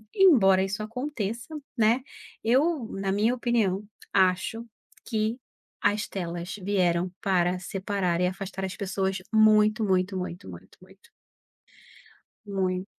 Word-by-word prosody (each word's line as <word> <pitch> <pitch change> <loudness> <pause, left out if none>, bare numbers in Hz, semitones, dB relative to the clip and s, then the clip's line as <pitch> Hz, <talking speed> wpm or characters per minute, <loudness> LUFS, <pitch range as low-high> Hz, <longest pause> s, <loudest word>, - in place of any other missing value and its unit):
embora 230 - +6
isso 195 +2 -3
aconteça, 240 +2 -4 0.2
né, 230 +1 +3 0.4
eu 270 +2 +2
na 195 0 -2
minha 210 +5 +2
opinião 230 -6 0 0.3
acho 190 +5 +2 0.4
que 220 -1 -1 0.5
as 210 +1 +1
telas 175 -1 -5
vieram 180 -2 +1
para 180 -2 +2
separar 185 -2 -2
e 180 - +3
afastar 190 +1 -4
as 190 - -5
pessoas 190 -1 -1 0.2
muito, 215 0 +5
muito, 190 -1 +1
muito, 180 - -6
muito, 85 -2 -12
muito. - - -19 1.4
Mui 190 -2 -1
195 Hz, 115 wpm, -27 LUFS, 185-220 Hz, 1.4 s, embora